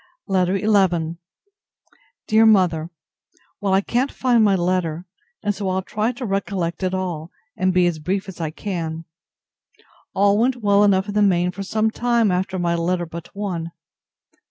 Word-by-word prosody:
LETTER 190 -1 +1
XI 185 -6 +1 1.1
DEAR 220 +1 +5
MOTHER, 175 -6 +3 0.7
Well, 200 -2 0
I 195 - +3
can't 245 +6 -1
find 245 -3 +2
my 200 -2 +4
letter, 175 -2 -1 0.4
and 205 0 +1
so 195 -1 -3
I'll 185 0 -1
try 215 +5 -1
to 245 +1 -6
recollect 195 -4 -2
it 185 0 -1
all, 175 -4 -4 0.3
and 185 0 +1
be 180 -1 +3
as 170 -3 0
brief 190 +6 -2
as 185 -3 -8
I 160 - -1
can. 165 -2 -5 1.1
All 200 +1 +3
went 250 +3 +2
well 205 -3 +3
enough 195 -1 +3
in 205 - -4
the 210 - +2
main 180 -3 +3
for 195 - -8
some 215 +3 0
time 235 -3 +1
after 185 +1 -1
my 175 -1 0
letter 175 +1 0
but 165 0 -8
one. 180 -5 -3
190 Hz, 165 wpm, -21 LUFS, 175-205 Hz, 1.1 s, DEAR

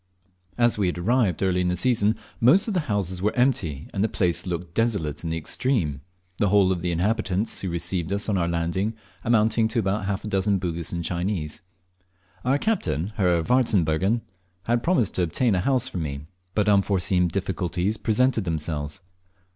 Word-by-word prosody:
As 120 -3 +2
we 100 - +2
had 90 - -2
arrived 100 -1 +1
early 90 -1 +2
in 90 - 0
the 90 - +1
season, 110 +1 +2 0.2
most 150 - +5
of 215 - -1
the 180 - +2
houses 95 -3 -1
were 105 +2 0
empty, 95 - 0
and 100 - 0
the 110 - +1
place 90 -2 0
looked 85 -1 -4
desolate 100 -11 -1
in 85 - -3
the 80 - -1
extreme 80 - -1 0.4
the 105 - +3
whole 100 -1 +4
of 90 -2 -1
the 90 - -1
inhabitants 95 +3 0
who 95 - -3
received 85 +1 -2
us 100 +1 -1
on 105 - +1
our 85 -2 +1
landing 85 +6 -1 0.3
amounting 110 -1 +3
to 115 - -4
about 100 -1 0
half 100 0 -2
a - - -5
dozen 100 0 +1
Bugis 85 -2 -4
and 85 -1 -3
Chinese. 85 -3 -3 0.8
Our 130 +3 +2
captain, 105 - -1
Herr 90 -4 +2
Warzbergen, 100 -3 +2 0.4
had 120 +3 +1
promised 165 - +1
to - - -1
obtain 100 +7 +1
a 95 - +1
house 130 +3 +1
for 90 - -5
me, 70 -3 -4 0.3
but 105 -1 +2
unforeseen 95 -3 +3
difficulties 95 +2 -2
presented 115 +2 +1
themselves. 75 -2 -2
95 Hz, 180 wpm, -24 LUFS, 85-110 Hz, 0.8 s, most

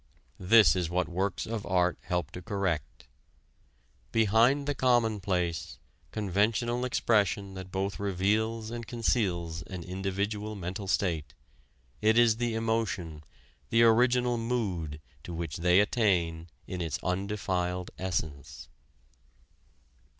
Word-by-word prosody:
This 95 -2 +6
is 90 -3 -1
what 90 +1 0
works 95 +2 -2
of 110 -2 -4
art 90 -2 +2
help 90 -4 -2
to 90 - -8
correct: 95 - -3 1.1
"Behind 115 +6 +3
the 145 - 0
commonplace, 105 - 0 0.3
conventional 110 +4 0
expression 105 -5 +1
that 95 -1 -8
both 95 +1 -2
reveals 110 +3 0
and 115 -1 -6
conceals 90 -9 -1
an 90 -3 -6
individual 100 +3 -3
mental 95 +1 -5
state, 85 -6 -1 0.7
it 110 +1 +4
is 115 -2 +5
the 120 -1 -1
emotion, 110 -9 -2 0.5
the 115 0 +4
original 120 +1 +4
mood, 95 -11 -2 0.2
to 85 - -7
which 80 -2 -4
they 90 +2 +4
attain 90 -7 +1 0.2
in 90 -1 -5
its 80 -4 -2
undefiled 90 -1 -2
essence." 75 -6 -4
100 Hz, 115 wpm, -29 LUFS, 90-115 Hz, 1.1 s, This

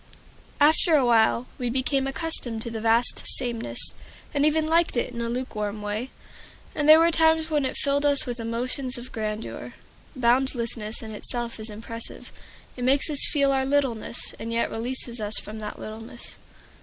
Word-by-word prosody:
After 315 +3 +4
a 275 -4 +4
while 230 0 +3
we 245 -1 -1
became 265 +2 0
accustomed 270 -6 +3
to 235 - -4
the 225 -1 -5
vast 230 +2 +3 0.2
sameness, 240 -3 -1 0.4
and 290 0 +3
even 310 +1 +2
liked 330 -3 +2
it 240 - -1
in 235 - -5
a 230 - -2
lukewarm 215 -4 -4
way. 210 +5 -3 0.6
And 300 0 0
there 310 - +11
were 335 +1 +4
times 320 0 +3
when 295 -3 +1
it 260 - -3
filled 280 0 +1
us 285 -1 +2
with 245 -1 -5
emotions 250 +3 -3
of 245 +2 -9
grandeur. 215 0 -5 0.4
Boundlessness 235 -3 0
in 220 - -7
itself 235 +2 -3
is 215 +1 -5
impressive; 230 +2 -9 0.4
it 250 - -6
makes 275 +4 +2
us 290 - +3
feel 280 -2 +3
our 265 -1 +1
littleness, 265 -4 -1
and 230 - -5
yet 230 0 0
releases 240 +1 -5
us 210 0 -1
from 215 +1 -6
that 210 -1 -6
littleness. 225 +2 -9
245 Hz, 170 wpm, -25 LUFS, 225-280 Hz, 0.6 s, there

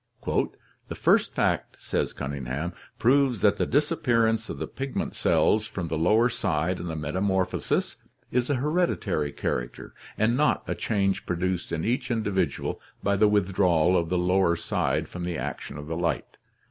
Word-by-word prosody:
'The - - -3
first - - +3
fact/ - - 0
says - - -1
Cunning 70 -2 -5
ham, 75 +8 -3 0.2
'proves 125 -1 +3
that 105 - +4
the - - 0
disappearance 120 -7 +1
of - - -5
the - - -3
pigment 135 0 -4
cells 110 0 +2
from 90 -6 -5
the 80 - -1
lower 110 +8 +4
side 90 -6 -1
in 85 - -5
the 80 - -3
metamorphosis 95 +5 -1 0.3
is 125 +1 +1
a 145 - +2
hereditary 130 - 0
character, 60 -3 -4 0.2
and 110 +3 +2
not 150 +3 +2
a - - 0
change 100 -3 -1
produced 90 0 -1
in 80 -1 -2
each 125 +4 0
individual 100 - -1 0.2
by 100 0 +2
the 105 +2 +5
withdrawal 95 -4 +3
of 85 -2 +1
the 90 - +1
lower 90 0 +3
side - - -1
from 90 - -7
the 85 -2 -2
action 70 - -5
of 75 - -7
the 80 +2 -4
light. 85 -1 -2
95 Hz, 165 wpm, -26 LUFS, 85-115 Hz, 0.3 s, the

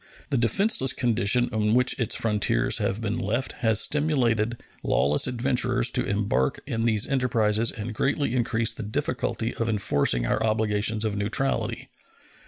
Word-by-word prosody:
The 135 - +2
defenseless 130 - +2
condition 120 -1 +2
in 110 0 +1
which 125 +1 +2
its 115 - 0
frontiers 105 - +1
have 100 +4 -2
been 115 +1 -2
left 120 +2 -2
has 110 -3 +2
stimulated 120 -7 +1 0.2
lawless 75 +1 +1
adventurers 125 0 +1
to - - +1
embark 100 -10 -1
in 115 0 -2
these 110 -3 +2
enterprises 115 -5 +1
and 110 +1 -6
greatly 140 +2 -1
increased 115 -2 0
the - - -5
difficulty 110 +2 -3
of 115 0 -3
enforcing 70 - +1
our 105 - -1
obligations 110 0 0
of 105 -2 -2
neutrality. 115 +2 -2
115 Hz, 145 wpm, -25 LUFS, 105-125 Hz, 0.2 s, The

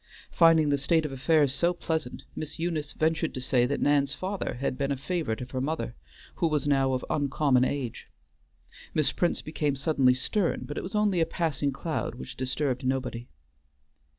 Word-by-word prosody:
Finding 165 -3 +5
the 140 -1 +2
state 160 +3 +2
of 150 - -3
affairs 145 +1 +2
so 170 +4 +2
pleasant, 160 -6 -3
Miss 155 - -5
Eunice 160 -3 -2
ventured 160 +1 0
to - - -3
say 125 -1 +2
that 140 - -1
Nan's 140 -1 +2
father 190 +1 -3
had 130 +1 -2
been 140 +1 -1
a 140 - 0
favorite 140 -6 -2
of 125 - -7
her 130 - -2
mother, 145 - -2 0.4
who 170 - +2
was 150 -3 0
now 135 -2 +3
of 130 - -2
uncommon 140 -2 +2
age. 130 -3 -3 0.9
Miss 155 - +2
Prince 175 - 0
became 150 -2 -1
suddenly 135 -2 +3
stern, 175 +7 0
but 145 - -6
it - - -2
was 190 - -6
only 210 -4 +2
a - - +4
passing 150 -4 -1
cloud, 155 +3 -3
which 65 - -8
disturbed 130 +1 -1
nobody. 130 -2 -2
145 Hz, 180 wpm, -28 LUFS, 130-160 Hz, 0.9 s, Finding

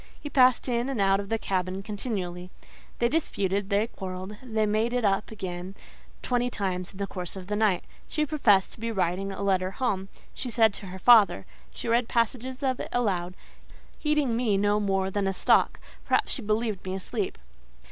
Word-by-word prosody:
He 290 - -7
passed 255 -2 +5
in 240 +1 0
and 265 -5 -2
out 195 0 +3
of 200 -1 -6
the 225 - +1
cabin 185 -1 -2
continually: 195 -5 -4 0.5
they 235 - +3
disputed, 200 - -1
they 205 +1 +2
quarrelled, 190 -2 -7
they 220 -4 0
made 215 +3 +1
it 245 -3 +1
up 195 0 +1
again 185 -3 -6 0.5
twenty 245 0 +1
times 185 -5 -3
in - - -13
the 200 - -1
course 180 -2 -5
of 190 -1 -7
the 210 +2 -2
night. 210 -4 +2 0.2
She 305 -1 0
professed 230 -10 +3
to - - -10
be 230 +1 -2
writing 190 0 -1
a 195 +1 -5
letter 185 -2 +2
home—she 195 +2 -4
said 225 -2 +4
to 200 - -7
her 185 +1 -7
father; 205 - +6 0.2
she - - -7
read 230 +1 +2
passages 255 +3 -1
of 260 -2 0
it - - -5
aloud, 185 -7 0 0.6
heeding 300 -6 +1
me 225 -4 +2
no 205 +1 +2
more 195 -2 0
than 200 0 0
a 195 - 0
stock—perhaps - - +1
she 265 - -1
believed 215 -2 -1
me 185 0 -3
asleep. 200 +2 -3
205 Hz, 185 wpm, -27 LUFS, 190-235 Hz, 0.6 s, father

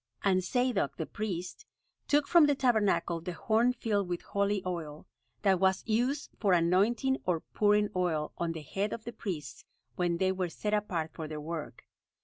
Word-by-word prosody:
And 185 -2 +3
Zadok, 240 - 0
the 160 - -2
priest, 180 -3 -5 0.4
took 290 0 +3
from 335 -4 +6
the 290 - +3
Tabernacle 205 -10 +2
the 180 +1 -5
horn 225 +7 +2
filled 205 -6 -1
with 175 -1 -3
holy 200 -1 0
oil, 160 -4 -5 0.4
that 190 -3 +4
was 190 0 +2
used 245 +6 0
for 200 -4 +3
anointing 205 +10 +2
or 170 -3 +1
pouring 210 0 +2
oil 165 -4 0
on 170 -1 -1
the 160 -2 -7
head 195 +8 -2
of 225 - -6
the 235 - -7
priests 175 -10 -6 0.3
when 175 -1 +1
they 190 +1 +2
were 185 -2 -2
set 210 +5 -3
apart 175 -7 -1
for 160 -2 -6
their 155 0 -5
work. 160 +1 -6
190 Hz, 175 wpm, -30 LUFS, 170-220 Hz, 0.4 s, from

